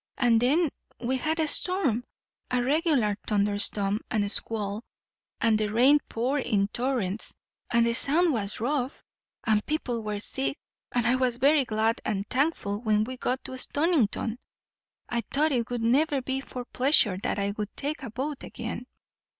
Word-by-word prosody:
and 235 -3 +3
then 305 +8 +3 0.3
we 250 +2 -1
had 310 +5 -1
a 320 - +2
storm, 305 - +2 0.5
a 250 - +1
regular 280 - +2
thunderstorm 205 0 +2
and 205 -2 +1
squall, 215 -1 0 0.6
and 225 -2 +2
the 215 - 0
rain 260 +7 +5
poured 260 +4 -1
in 200 -2 +1
torrents, 235 -5 -1 0.4
and 235 -1 +4
the 235 - +1
Sound 315 +7 +5
was 210 -3 -3
rough, 260 +2 -2 0.4
and 215 -2 +2
people 255 -7 -2
were 210 -1 -4
sick, 270 +6 +1 0.3
and 245 -1 0
I 240 - +3
was 250 -2 0
very 280 +2 +4
glad 220 0 0
and 205 -1 -2
thankful 255 -8 -1
when 215 -2 +2
we 255 +4 -5
got 255 +1 -2
to 260 - -6
Stonington. 255 - 0 0.7
I 240 -1 -1
thought 305 +3 +1
it 240 -4 0
would 240 -2 -3
never 280 +5 +2
be 265 +1 -3
for 250 -2 -7
pleasure 245 -9 +2
that - - -2
I 200 0 -1
would 210 0 -4
take 290 +1 -3
a 265 - -6
boat 270 +5 -4
again." 240 +1 -6
245 Hz, 165 wpm, -27 LUFS, 215-275 Hz, 0.7 s, rain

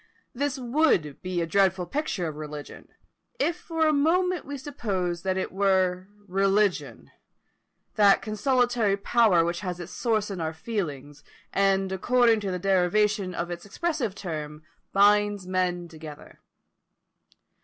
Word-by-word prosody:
This 285 +2 -2
would 245 - +1
be 180 -1 -2
a - - 0
dreadful 190 +1 +2
picture 215 - -2
of 155 - -5
religion, 150 -1 -8 0.5
if 320 +5 +1
for 325 -2 -1
a 310 - +3
moment 355 +5 +1
we 285 0 -5
supposed 190 - -3
that 190 -1 0
it 190 - -2
were 185 -1 +1 0.2
religion; 195 +1 0 0.9
that 200 -2 +6
consolatory 235 -1 +1
power 200 -5 +3
which 170 0 -2
has 180 -3 -4
its 175 - -8
source 215 -4 -1
in 185 -3 -4
our 160 0 -2
feelings, 145 - -5 0.3
and 195 -1 +2
according 230 +4 +3
to 200 -2 -3
the 180 - -2
derivation 195 +1 +1
of 170 +1 -3
its 175 0 -6
expressive 235 - -2
term, 155 -5 -6 0.3
binds 205 0 +3
men 180 -1 -1
together. 155 -3 -11
195 Hz, 135 wpm, -26 LUFS, 175-230 Hz, 0.9 s, that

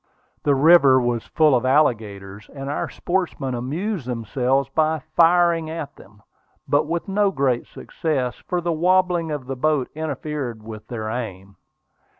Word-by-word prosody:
The 145 -1 +2
river 140 -2 +6
was 120 -2 -1
full 155 -3 +3
of 125 -1 +2
alligators, 105 -8 0
and 135 0 -5
our - - -3
sportsmen 175 -8 -2
amused 150 - -3
themselves 125 +3 0
by 155 +3 +1 0.2
firing 170 -1 +4
at 160 -3 -6
them, 100 0 -18 0.4
but 145 +1 +2
with 170 +4 -3
no 200 +1 +2
great 135 -8 0
success, 135 -6 -3
for 180 -1 -1
the 170 0 -1
wobbling 180 0 +2
of 145 -4 -4
the 135 +1 -4
boat 145 -1 0
interfered 145 -6 -4
with 110 -1 -9
their 110 -3 -5
aim. 100 -5 -6
140 Hz, 150 wpm, -22 LUFS, 120-165 Hz, 0.4 s, river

